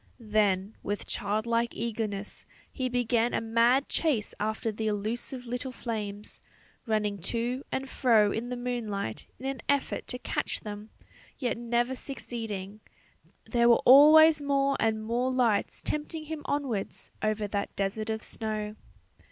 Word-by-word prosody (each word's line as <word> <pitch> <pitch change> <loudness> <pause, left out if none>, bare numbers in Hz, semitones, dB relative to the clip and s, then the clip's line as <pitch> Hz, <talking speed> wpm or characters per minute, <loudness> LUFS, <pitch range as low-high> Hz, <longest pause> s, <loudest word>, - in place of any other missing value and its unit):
Then 200 -1 +2
with 205 +1 -3
childlike 230 +3 -1
eagerness 215 -3 -3 0.3
he 260 -2 -2
began 240 -1 +1
a - - +2
mad 235 +4 +3
chase 275 -11 0
after 220 +1 -1
the 220 +1 -3
elusive 225 +5 -2
little 245 +2 -3
flames, 210 -4 -5 0.5
running 210 -2 0
to 240 +8 -2
and 265 0 -2
fro 225 -6 +4
in 235 +4 -3
the 250 - -3
moonlight 225 - -3
in 265 - -10
an 270 -1 -3
effort 280 -1 0
to 250 - -3
catch - - -2
them, 210 0 -7 0.5
yet 245 -4 -1
never 240 +2 0
succeeding; 220 -7 -5 0.7
there 235 -1 +3
were 235 - +5
always 305 +3 +8
more 275 -1 +2
and 220 -1 +1
more 245 +3 0
lights 240 -5 +1
tempting 300 +1 -3
him 315 0 -5
onwards 265 -9 -3
over 215 -1 0
that 200 0 -3
desert 205 +3 -2
of 220 0 -2
snow. 215 -1 -3
230 Hz, 140 wpm, -29 LUFS, 210-255 Hz, 0.7 s, always